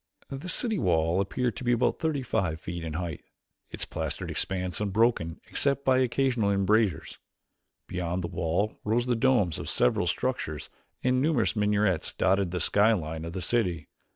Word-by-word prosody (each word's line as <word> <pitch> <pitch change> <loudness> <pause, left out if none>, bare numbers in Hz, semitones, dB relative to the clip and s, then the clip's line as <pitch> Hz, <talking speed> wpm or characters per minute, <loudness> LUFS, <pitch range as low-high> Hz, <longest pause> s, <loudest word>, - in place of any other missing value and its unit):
The 140 +7 -5
city 225 +2 0
wall 85 -1 +2
appeared 120 +5 -1
to 130 - -6
be 120 0 +2
about 120 - +1
thirty 155 -5 -1
feet 85 -6 -2
in 80 -2 -4
height, 80 -2 -4 0.5
its - - -5
plastered - - -4
expanse 90 0 -1
unbroken 105 -5 +1
except 140 0 0
by 130 -1 +4
occasional 125 -4 +1
embrasures. 100 -4 +1 0.7
Beyond 90 0 -3
the - - -2
wall 90 +4 -1
rose 115 +3 +1
the 125 -1 +1
domes 115 - +2
of - - -5
several 60 - +2
structures - - -2 0.3
and 125 0 +2
numerous 145 -7 +1
minarets 105 -4 +1
dotted 95 0 +2
the 90 +1 -3
sky 105 +6 +4
line 80 -4 -4
of 85 - -6
the 95 - -4
city. 90 -8 -1
100 Hz, 160 wpm, -28 LUFS, 85-120 Hz, 0.7 s, by